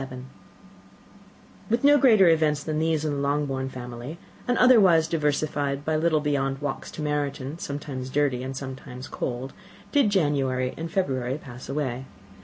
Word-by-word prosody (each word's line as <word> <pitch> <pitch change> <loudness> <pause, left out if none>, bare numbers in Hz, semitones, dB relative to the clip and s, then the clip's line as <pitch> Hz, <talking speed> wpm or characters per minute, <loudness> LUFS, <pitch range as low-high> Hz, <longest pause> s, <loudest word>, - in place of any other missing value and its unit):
With 235 +3 +1
no 290 +1 +6
greater 220 -8 +6
events 155 -3 +3
than 155 0 -2
these 160 -1 +1
in 150 - 0
the 140 - -2
Longbourn 140 -2 -1
family, 125 +4 -7 0.3
and 245 -1 +2
otherwise 195 -11 +6
diversified 145 -2 -1
by 155 - +1
little 155 -1 +2
beyond 135 -2 0
the 145 - -6
walks - - -4
to 155 - -5
Meryton, 145 0 -2
sometimes 140 -3 -5
dirty 135 -2 +1
and 130 +1 -5
sometimes 130 -1 -7
cold, 125 +2 -4 0.4
did 280 -7 +4
January 135 -8 +1
and 165 +1 -5
February 135 -8 -1
pass 125 -4 -11
away. 135 -3 -2
145 Hz, 150 wpm, -25 LUFS, 130-160 Hz, 0.4 s, no